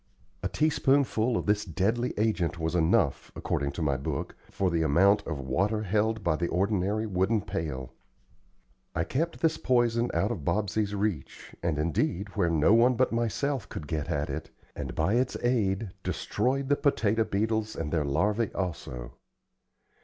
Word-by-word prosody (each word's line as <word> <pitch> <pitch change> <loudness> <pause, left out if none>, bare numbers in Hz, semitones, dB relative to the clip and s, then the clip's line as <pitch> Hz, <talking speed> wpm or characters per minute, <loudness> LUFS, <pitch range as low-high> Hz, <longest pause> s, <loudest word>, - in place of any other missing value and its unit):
A - - 0
teaspoonful 135 -6 +2
of - - -3
this 105 0 +2
deadly 110 +8 -1
agent 100 -6 0
was 80 0 -2
enough, 85 -2 +2
according 70 -1 -1
to 85 - -3
my 70 -3 +1
book, 65 - -4
for 95 -2 0
the 85 -1 +1
amount 95 +7 +4
of 80 - -2
water 95 +11 0
held 110 +2 0
by 85 -3 +2
the 85 +2 -1
ordinary 100 +4 0
wooden 100 +2 +1
pail. 65 -8 -4 1.0
I 80 - +1
kept 165 - -2
this 160 -1 +2
poison 120 -1 +2
out 105 - 0
of 95 -11 -4
Bobsey's 105 +3 0
reach, 100 -8 -3
and, 85 -3 0
indeed, 85 +5 0
where 100 -4 0
no 80 +4 +4
one 120 +2 +5
but 130 +2 +2
myself 120 +2 -1
could 75 - -6
get 75 -1 -3
at 75 0 -1
it, - - -5 0.3
and, - - -5
by 100 - +1
its 125 +2 +1
aid, 110 -5 +1
destroyed 135 +7 -1
the 145 - +5
potato 115 -6 +2
beetles 110 +1 -1
and 80 -1 -4
their 80 -3 +2
larvae 100 +10 +1
also. 65 -10 -4
100 Hz, 160 wpm, -28 LUFS, 85-115 Hz, 1.0 s, one